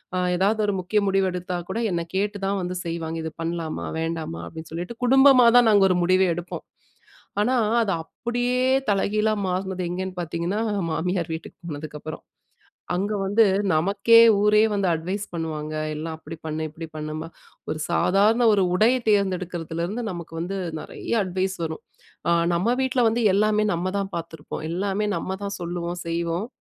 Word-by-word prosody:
அ - - +1 0.2
எதாவது 200 +5 +2
ஒரு 205 - 0
முக்கிய 185 +4 +1
முடிவு 195 0 +2
எடுத்தா 180 0 -3
கூட 225 - -2
என்ன 170 -1 -1
கேட்டு 205 +1 -1
தான் 195 0 0
வந்து 180 0 -3
செய்வாங்க, 165 -1 -3
இது 160 - -4
பண்ணலாமா? 165 -1 -3
வேண்டாமா? 165 0 -3
அப்பிடின்னு 160 -1 -9
சொல்லிட்டு, 175 +7 -5
குடும்பமா 265 -1 +7
தான் 245 -1 +6
நாங்க 200 -2 +6
ஒரு 185 - +2
முடிவே 185 +2 +4
எடுப்போம். 175 +1 -6 0.8
ஆனா, 255 +4 +2 0.3
அது 200 -3 0
அப்பிடியே 245 +8 -2 0.3
தலைகீழா 210 +2 +1
மாறுனது 185 -1 -2
எங்கேன்னு 185 +1 -4
பார்த்தீங்கன்னா, 170 +5 -2 0.3
மாமியார் 175 0 -1
வீட்டுக்கு 160 - -8
போனதுக்கப்புறம் 150 0 -7 0.7
அங்க 200 +4 -1
வந்து 205 +4 +4 0.3
நமக்கே 200 +8 +4 0.2
ஊரே 210 +1 +4
வந்து 200 -2 0
அட்வைஸ் 185 +6 -2
பண்ணுவாங்க, 155 -2 -4 0.2
எல்லாம் 160 +1 -4
அப்பிடி 160 +1 -9
பண்ணு, 155 0 -3
இப்பிடி 160 +2 -8
பண்ணும்மா! 155 +1 -5 0.4
ஒரு 155 - -2
சாதாரண 200 +7 +3
ஒரு 200 - +3
உடை 215 +5 +5 0.2
தேர்ந்தெடுக்குறதுலருந்து 185 0 -1
நமக்கு 170 -3 -7
வந்து 180 +4 -3 0.2
நிறைய - - -7
அட்வைஸ் 190 +1 -1
வரும். 160 0 -5 0.5
அ - - +4 0.2
நம்ம 190 +8 +1
வீட்ல 260 -1 +1
வந்து 225 +2 0
எல்லாமே 210 +2 +3
நம்ம 175 +2 -1
தான் 195 -1 -3
பார்த்துருப்போம். 160 -3 -6
எல்லாமே 195 +4 -1
நம்ம 190 - -3
தான் 200 0 -3
சொல்லுவோம், 175 0 -4
செய்வோம். 170 +3 -1
180 Hz, 155 wpm, -24 LUFS, 165-205 Hz, 0.8 s, குடும்பமா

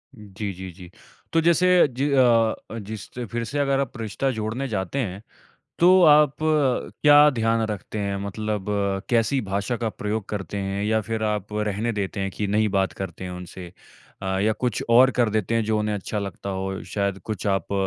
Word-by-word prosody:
जी, 105 -2 -6
जी, 95 +1 -8
जी। 90 0 -13 0.4
तो 165 - +4
जैसे 170 +2 +3 0.3
ज - - -2 0.7
अ, 115 - -5
जिससे 110 +4 -7
फ़िर 120 +1 -4
से 140 +6 -3
अगर 135 -1 +2
आप 135 -3 -3
रिश्ता 115 +4 -2
जोड़ने 115 +3 -3
जाते 100 +2 -3
हैं, 100 -6 -3 0.6
तो 185 +2 +6
आप 150 -3 +6
क्या 150 0 +4
ध्यान 115 -3 +1
रखते 105 +1 -5
हैं, 100 -1 -2
मतलब 105 0 -3 0.4
कैसी 120 +3 +2
भाषा 100 +3 -2
का 115 -1 -2
प्रयोग 105 0 -3
करते 100 -2 -5
हैं? 100 0 -2
या 110 +1 +2
फ़िर 110 +1 -4
आप 105 -1 -2
रहने 105 +2 -1
देते 100 -1 -3
हैं 95 0 -1
कि 105 +2 -3
नहीं 105 +2 +2
बात 95 -2 0
करते 95 -1 -7
हैं 90 - -5
उनसे। 90 0 -9 0.5
अ, 95 0 -1
या 110 +2 +2
कुछ 120 +3 -2
और 125 +3 +7
कर 120 -3 +3
देते 110 +1 -1
हैं 115 -1 +1
जो 110 0 +1
उन्हें 105 0 -1
अच्छा 105 +1 -4
लगता 100 0 -5
हो। 95 0 -4
शायद 100 -1 -2
कुछ 110 -2 -4
आप 95 -2 -1
105 Hz, 190 wpm, -24 LUFS, 100-120 Hz, 0.7 s, और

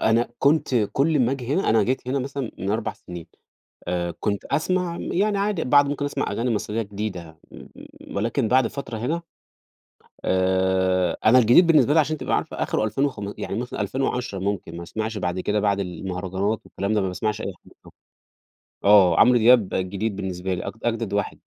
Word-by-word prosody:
أنا 115 +2 +2
كنت 140 -2 +2 0.2
كُلّ 150 +2 +2
ما 125 +2 +2
آجي 135 0 -3
هنا 190 - +1
أنا 110 -1 +4
جيت 125 +2 -2
هنا 135 +2 0
مثلًا 135 -2 -4
من 95 +2 -3
4 110 +1 -1
سنين 85 -2 -10 0.6
آآ، 85 -1 -1
كنت 100 -2 -2
أسمع 180 +1 -1
م - - -5
يعني 205 +2 +1
عادي 200 -4 0
بعض 145 +2 +5
ممكن 145 0 -2
أسمع 145 - -2
أغاني 120 +1 -1
مصرية 105 +2 -2
جديدة، 100 -6 -6
م - - -12 0.5
ولكن 115 +4 0
بعد 130 0 +4
فترة 120 -2 -6
هنا 155 +10 -2 1.0
آآ، 95 -1 +1
أنا 120 +4 +7
الجديد 125 +9 +6
بالنسبة 145 -4 +5
لي 160 - +5
عشان 155 0 +1
تبقى - - -1
عارفة - - -2
آخره - - -1
ألفين 110 +6 0
وخم 105 -7 -4
يعني 100 - -4
مثلًا 120 -3 -4
2010 125 -1 -2
ممكن 95 -3 -3
ما 85 - -6
أسمعش 110 +4 -4
بعد 90 -1 -2
كده، 105 +3 0
بعد 100 -1 +1
المهرجانات 95 +3 -3
والكلام 100 +2 -3
ده 105 - +2
ما 95 - -1
باسمعش 105 +4 -2
أي 100 - -4
حاجة - - -19
خالص، - - -17 0.9
آه، 100 -3 +6
عمرو 125 -1 +6
دياب 115 -3 +5
جديد 100 +3 -2
بالنسبة 95 -1 -3
لي 90 - -5
أج - - -5
أجدد 115 -3 -1
واحد 100 0 -2
110 Hz, 185 wpm, -23 LUFS, 95-130 Hz, 1.0 s, أنا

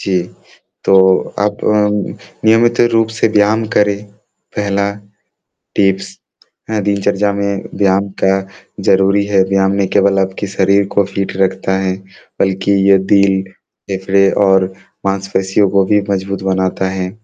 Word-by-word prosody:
जी। 95 -2 0 0.6
तो 95 - +3 0.4
आप 105 0 0
अ, 105 -1 +2 0.6
नियमित 115 +2 +3
रूप 115 -1 +2
से - - +3
व्यायाम 110 +1 +2
करें, 105 0 +1 0.5
पहला 100 0 0 0.9
टिप्स 95 -1 0 0.5
हाँ, 110 -1 0
दिनचर्या 100 0 0
में 100 -1 -2
व्यायाम 100 0 +1
का 95 0 +1 0.4
ज़रूरी 100 +1 +3
है, 100 -1 +2
व्यायाम 95 0 +2
ना 100 -1 +1
केवल 100 -1 +3
आपके 95 +1 -2
शरीर 100 +1 +2
को 100 - +3
फ़ीट 100 0 -4
रखता 95 0 0
है, 95 -1 -1 0.4
बल्कि 95 +1 0 0.2
ये 100 - +7 0.2
दिल, 100 -1 +3 0.5
फेफड़े 95 0 +2 0.2
और 95 -1 +3 0.3
मासपेशियों 95 0 0
को 100 0 +2
भी 105 +1 +2
मजबूत 100 0 -3
बनाता 95 0 -1
है। 95 -1 -3
100 Hz, 130 wpm, -15 LUFS, 95-100 Hz, 0.9 s, ये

